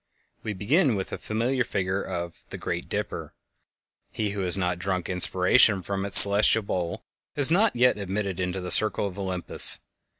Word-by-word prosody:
We 110 - -8
begin 130 - -2
with 95 -1 -8
the - - -10
familiar 120 +4 -5
figure 95 -3 -6
of 85 -2 -10
the - - -11
"Great - - -8
Dipper." - - -8 0.7
He 105 -2 -7
who 100 -1 -8
has 90 0 -1
not 90 -2 -5
drunk 95 -1 -6
inspiration 95 +3 0
from 95 +2 -7
its 100 - +10
celestial 105 +2 +7
bowl 90 -3 -7 0.3
is 145 +1 +5
not 205 +6 -1
yet 125 -2 -1
admitted 100 -1 -7
to 90 0 -6
the 90 - -3
circle 110 -1 +3
of 100 0 -10
Olympus. 95 -2 -1
100 Hz, 170 wpm, -22 LUFS, 90-110 Hz, 0.7 s, its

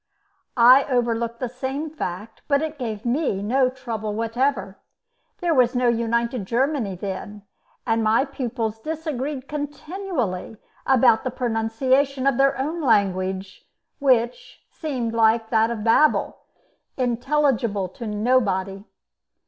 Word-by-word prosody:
I 250 +3 +7
overlooked 235 -2 -1
the 255 - -2
same 265 +5 -4
fact, 215 - -6
but 280 0 +2
it 310 -2 -5
gave 220 -3 -4
me 240 -6 0
no 255 +4 +2
trouble 225 -5 -5
whatever. 225 -3 -1 0.6
There 345 -2 +2
was 250 -3 +3
no 245 -1 +3
united 235 -2 -1
Germany 245 -4 0
then, 200 +2 -6 0.4
and 225 0 +1
my 220 +5 +3
pupils 235 -5 -4
disagreed 295 -2 -4
continually 290 - -4 0.3
about 255 -4 +4
the 255 - -1
pronunciation 255 +3 0
of 275 -2 +2
their 275 0 +3
own 310 +6 -2
language, 190 -5 0 0.3
which 250 -3 0
seemed, 255 -8 -3
like 225 0 +2
that 225 0 +3
of 225 -3 -4
Babel, 235 +7 +3 0.6
intelligible 245 -5 0
to 230 +5 -8
nobody. 205 -4 0
240 Hz, 120 wpm, -23 LUFS, 220-270 Hz, 0.6 s, I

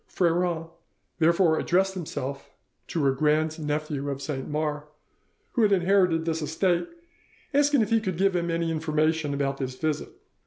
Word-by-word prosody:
Freron 170 -1 0 0.5
therefore 170 0 +4
addressed 190 +2 +2
himself 140 -6 -5 0.4
to 160 -4 -1
a 135 - +4
grand 155 +3 +1
nephew 150 -1 -2
of 140 -1 -3
Saint 140 -1 -4
Mars, 150 0 -2 0.7
who 240 - 0
had 210 -2 +4
inherited 180 -3 +3
this 165 -1 -1
estate, 170 - 0 0.7
asking 285 -3 +4
if 215 - -4
he 225 -1 +4
could 185 -5 -3
give 195 0 +2
him 170 -1 0
any 165 0 0
information 155 -1 0
about 140 -1 -1
this 130 -2 -4
visit. 155 +2 -2
160 Hz, 155 wpm, -26 LUFS, 150-180 Hz, 0.7 s, therefore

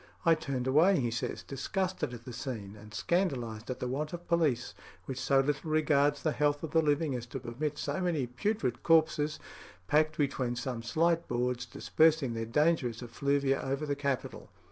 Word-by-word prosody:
"I 165 - +7
turned 135 -5 -2
away," 155 +7 +5
he 120 -3 0
says, 115 - -3
"disgusted 185 +4 -2
at 120 -1 -9
the 125 - -7
scene, 115 -5 -5
and 105 0 -13
scandalised 120 - -1
at 130 - -3
the 125 - -2
want 150 +6 -3
of 175 0 -7
police 155 -8 +1 0.3
which 135 -1 -5
so 135 0 +3
little 145 +3 -2
regards 145 -2 +2
the 155 - +2
health 145 0 +1
of 160 - -4
the 165 - +4
living 150 -1 +1
as 125 -1 -4
to 135 - -5
permit 135 +5 -3
so 145 +5 -2
many 165 -7 0
putrid 125 - -2
corpses, 155 -2 +3 0.5
packed 155 +7 +2
between 130 -4 0
some 125 -1 -3
slight 165 +7 +1
boards, 125 0 -1
dispersing 155 -5 +2
their 115 0 -3
dangerous 130 -3 +1
effluvia 135 +3 0
over 135 +3 -2
the 145 -1 -1
capital." 140 -3 -3
140 Hz, 180 wpm, -31 LUFS, 125-155 Hz, 0.5 s, I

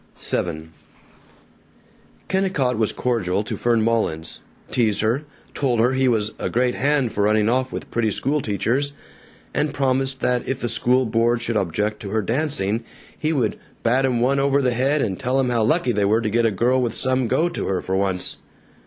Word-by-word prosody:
VII 80 -2 -2 1.6
Kennicott 185 -10 0
was 110 -1 +1
cordial 105 -6 -1
to - - -4
Fern 115 -2 +1
Mullins, 95 -9 -1 0.3
teased 110 -5 +1
her, 120 +7 0 0.3
told 125 -5 0
her 120 +3 +3
he 130 0 +2
was 110 -3 +1
a - - -2
"great 125 +1 +1
hand 140 -3 +1
for 100 - +1
running 105 0 +3
off 130 +2 +1
with - - -7
pretty 115 -2 +1
school 140 +7 0
teachers," 125 +7 -1 0.6
and 150 -1 -1
promised 135 0 0
that 125 -1 0
if 135 -1 -2
the 120 - -2
school 125 +3 +2
board 115 +1 +2
should 115 -1 -2
object 105 +3 -1
to 100 - -7
her 110 +1 0
dancing, 115 -3 -1 0.3
he 155 - -1
would 125 -9 0 0.2
"bat 125 +3 +2
'em 125 -3 +1
one 135 +3 +2
over 140 0 +2
the 125 -3 +1
head 135 +4 +1
and 95 -4 -2
tell 130 +2 0
'em 130 -2 +1
how 120 -2 +1
lucky 140 +3 +2
they 105 -3 0
were 110 +3 +3
to 110 -2 -2
get 115 +1 +3
a - - +3
girl 125 +6 +2
with 120 -2 -2
some 130 -1 +1
go 160 +8 +2
to 175 - -4
her, 95 -1 0
for 95 - -3
once." 95 -2 0
120 Hz, 195 wpm, -22 LUFS, 110-130 Hz, 1.6 s, her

